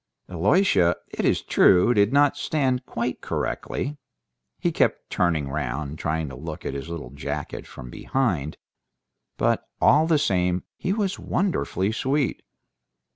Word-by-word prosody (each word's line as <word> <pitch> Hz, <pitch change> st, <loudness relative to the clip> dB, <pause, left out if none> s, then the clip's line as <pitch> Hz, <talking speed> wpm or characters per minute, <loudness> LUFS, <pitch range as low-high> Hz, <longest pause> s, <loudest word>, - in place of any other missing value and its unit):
Aliosha, 90 Hz, -, +3 dB
it -, -, -3 dB
is -, -, +2 dB
true, 95 Hz, +6 st, +5 dB
did 100 Hz, 0 st, +3 dB
not 145 Hz, 0 st, +4 dB
stand 130 Hz, -4 st, 0 dB
quite 120 Hz, +1 st, -3 dB
correctly; 145 Hz, +3 st, -3 dB, 0.6 s
he -, -, 0 dB
kept -, -, 0 dB
turning 80 Hz, -5 st, +1 dB
round, 70 Hz, +1 st, -3 dB
trying 80 Hz, 0 st, -1 dB
to 65 Hz, -, -8 dB
look 75 Hz, +3 st, -7 dB
at -, -, -2 dB
his 70 Hz, +3 st, -6 dB
little 80 Hz, -7 st, -6 dB
jacket 70 Hz, -, -5 dB
from 60 Hz, -2 st, -10 dB
behind; 85 Hz, -, -1 dB, 0.8 s
but -, -, 0 dB
all 155 Hz, +4 st, +5 dB
the 165 Hz, -2 st, +4 dB
same 90 Hz, -9 st, +1 dB
he 185 Hz, -, -2 dB
was 200 Hz, -2 st, -1 dB
wonderfully 170 Hz, -, 0 dB
sweet. 135 Hz, +4 st, 0 dB
95 Hz, 135 wpm, -24 LUFS, -, 0.8 s, true